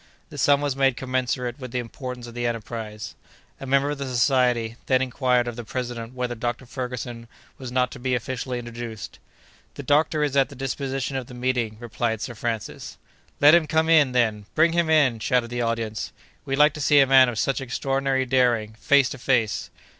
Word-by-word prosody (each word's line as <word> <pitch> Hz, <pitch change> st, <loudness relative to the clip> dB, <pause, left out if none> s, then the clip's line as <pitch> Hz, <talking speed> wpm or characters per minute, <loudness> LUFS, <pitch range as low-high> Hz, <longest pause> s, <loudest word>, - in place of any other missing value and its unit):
The -, -, -9 dB
sum 145 Hz, 0 st, +4 dB
was 145 Hz, -2 st, -1 dB
made 135 Hz, -2 st, +2 dB
commensurate 130 Hz, 0 st, -2 dB
with 130 Hz, -1 st, -7 dB
the 125 Hz, -, -3 dB
importance 125 Hz, +1 st, -6 dB
of 120 Hz, -, -10 dB
the 120 Hz, 0 st, -2 dB
enterprise. 110 Hz, -2 st, -5 dB, 0.5 s
A 135 Hz, -, -7 dB
member 140 Hz, +2 st, +2 dB
of 145 Hz, -, -5 dB
the 140 Hz, -, -3 dB
Society 125 Hz, -2 st, +2 dB
then 130 Hz, -1 st, +4 dB
inquired 125 Hz, -1 st, +1 dB
of 120 Hz, -, -4 dB
the 120 Hz, -, -6 dB
president 120 Hz, 0 st, -5 dB
whether 125 Hz, -1 st, -2 dB
Dr. 120 Hz, +2 st, -4 dB
Ferguson 125 Hz, -2 st, -6 dB, 0.3 s
was 130 Hz, -2 st, -7 dB
not 125 Hz, 0 st, +1 dB
to -, -, -9 dB
be 125 Hz, 0 st, 0 dB
officially 125 Hz, +1 st, -3 dB
introduced. 120 Hz, -3 st, -7 dB, 0.6 s
"The 140 Hz, -, -7 dB
doctor 150 Hz, +2 st, +2 dB
is 145 Hz, -2 st, -1 dB
at 135 Hz, -1 st, +3 dB
the 140 Hz, -, -11 dB
disposition 135 Hz, 0 st, -3 dB
of 130 Hz, -2 st, -5 dB
the 125 Hz, -, -11 dB
meeting," 125 Hz, -3 st, -1 dB
replied 115 Hz, -1 st, -2 dB
Sir 120 Hz, -, -5 dB
Francis. 115 Hz, -2 st, -5 dB, 0.4 s
"Let 145 Hz, +2 st, +7 dB
him 170 Hz, -3 st, +5 dB
come 160 Hz, +1 st, +1 dB
in, 155 Hz, -5 st, +5 dB
then! 110 Hz, -5 st, 0 dB
Bring 165 Hz, +1 st, +4 dB
him 170 Hz, -1 st, +1 dB
in!" 140 Hz, -7 st, +3 dB
shouted 120 Hz, +1 st, 0 dB
the 120 Hz, 0 st, -2 dB
audience. 115 Hz, -3 st, -2 dB, 0.3 s
"We'd 135 Hz, -, -1 dB
like 150 Hz, 0 st, +5 dB
to 150 Hz, -, -7 dB
see 145 Hz, +1 st, +5 dB
a 135 Hz, -, +7 dB
man 130 Hz, -1 st, +6 dB
of 115 Hz, -, -5 dB
such 135 Hz, +4 st, 0 dB
extraordinary 135 Hz, +1 st, -1 dB
daring, 120 Hz, -4 st, +2 dB
face 140 Hz, -3 st, +4 dB
to 135 Hz, -, -7 dB
face!" 120 Hz, -5 st, 0 dB
125 Hz, 200 wpm, -24 LUFS, 120-135 Hz, 0.6 s, Let